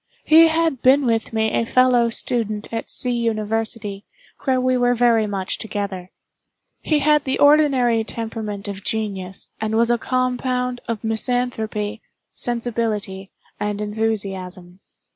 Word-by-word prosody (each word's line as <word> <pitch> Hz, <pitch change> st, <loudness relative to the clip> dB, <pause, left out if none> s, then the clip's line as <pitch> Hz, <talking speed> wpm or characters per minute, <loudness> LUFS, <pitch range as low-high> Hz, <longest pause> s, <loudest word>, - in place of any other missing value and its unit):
He 325 Hz, +1 st, +7 dB
had 320 Hz, -5 st, 0 dB
been 270 Hz, +2 st, +4 dB
with 225 Hz, -2 st, 0 dB
me 220 Hz, -1 st, 0 dB
a -, -, +1 dB
fellow 245 Hz, 0 st, +3 dB
student 220 Hz, -2 st, -3 dB
at 225 Hz, -, -4 dB
C—— 250 Hz, -, -1 dB
University, 220 Hz, -3 st, -2 dB, 0.4 s
where 260 Hz, -2 st, +2 dB
we 255 Hz, 0 st, +1 dB
were 245 Hz, 0 st, +2 dB
very 230 Hz, -2 st, +3 dB
much 195 Hz, -2 st, -3 dB
together. 200 Hz, -4 st, -4 dB, 0.7 s
He 305 Hz, -, +1 dB
had 300 Hz, 0 st, +3 dB
the 265 Hz, -2 st, -1 dB
ordinary 275 Hz, -6 st, +4 dB
temperament 220 Hz, -3 st, -5 dB
of 200 Hz, -1 st, -6 dB
genius, 195 Hz, -4 st, -2 dB
and 220 Hz, 0 st, -1 dB
was 235 Hz, +1 st, +3 dB
a 240 Hz, -, +1 dB
compound 250 Hz, 0 st, -1 dB
of 230 Hz, -2 st, -4 dB
misanthropy, 220 Hz, -2 st, -1 dB, 0.3 s
sensibility, 225 Hz, -5 st, 0 dB, 0.3 s
and 210 Hz, 0 st, -2 dB
enthusiasm. 195 Hz, -4 st, -3 dB
225 Hz, 130 wpm, -21 LUFS, 210-250 Hz, 0.7 s, He